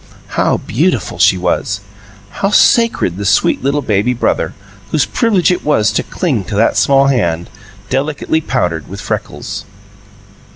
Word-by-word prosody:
How - - +1
beautiful - - -1
she 95 - +5
was! 90 +3 -1 0.6
How 195 - +2
sacred 230 - +3
the 100 - -4
sweet 95 - +2
little 140 +2 0
baby 110 +3 +1
brother, 120 - -1 0.3
whose 150 +2 +1
privilege 205 -7 +2
it 180 - -1
was 110 -8 +2
to 110 - 0
cling 135 - -2
to 100 - -5
that 110 +3 +2
small 135 0 +4
hand, 90 -11 0 0.4
delicately 145 +3 -1
powdered 90 - -2
with - - -8
freckles. - - -5
125 Hz, 140 wpm, -15 LUFS, 100-150 Hz, 0.6 s, she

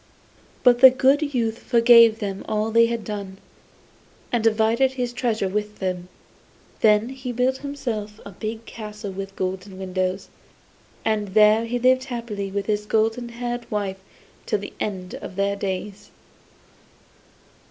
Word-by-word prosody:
But 245 -1 +5
the 260 - +11
good 275 +3 +2
youth 230 -2 0
forgave 230 -2 +6
them 200 -3 -4
all 215 +1 -1
they 230 +1 +5
had 230 -1 -3
done, 200 -3 -6 0.9
and 240 -2 0
divided 225 +4 +2
his 245 -2 -3
treasures 220 -6 -1
with 210 0 -3
them. 180 -2 -3 0.7
Then 215 +1 +4
he 260 -1 -6
built 250 +2 +1
himself 230 -7 -5
a 200 - -8
big 220 +4 -6
castle 210 -2 -7
with 195 +1 -7
golden 185 +1 -4
windows, 185 0 -3 0.8
and 210 -3 -1
there 215 +1 +5
he 240 +2 -2
lived 255 +1 +3
happily 230 -6 -5
with 200 +1 -3
his 210 -1 -1
golden 225 +3 0
haired 240 0 -5
wife 200 -3 -3 0.5
till 210 - +1
the 205 - -8
end 185 -3 -4
of 185 - -8
their 200 +1 0
lives. 200 +1 -5
215 Hz, 140 wpm, -23 LUFS, 200-240 Hz, 0.9 s, the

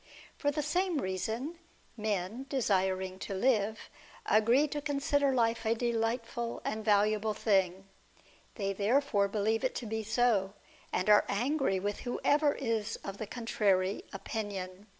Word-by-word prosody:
Tor 290 - +1
the 295 +1 -1
same 355 +3 0
reason, 225 - -3 0.4
men, 215 +3 -2
desiring 190 -7 0
to 195 - -5
live, 215 -1 +1 0.4
agree 235 +7 +4
to 295 0 -3
con 285 -1 -2
sider 280 0 +2
life 230 -2 +1
a 225 0 +2
delightful 235 0 -2
and 220 0 -2
valuable 210 0 +2
thing; 195 -3 +1 0.7
they 195 -2 -1
therefore 210 +1 +2
believe 215 +3 0
it 260 - 0
to 245 - -4
be 220 0 -2
so, 220 -3 +1 0.4
and 185 - -1
are 210 -1 +6
angry 245 -1 +1
with 205 +2 -3
whoever 290 +4 +2
is 225 -3 -1
of 195 0 -6
the 215 - -4
contrary 200 -5 0
opinion. 195 -1 -5
220 Hz, 140 wpm, -31 LUFS, 200-250 Hz, 0.7 s, are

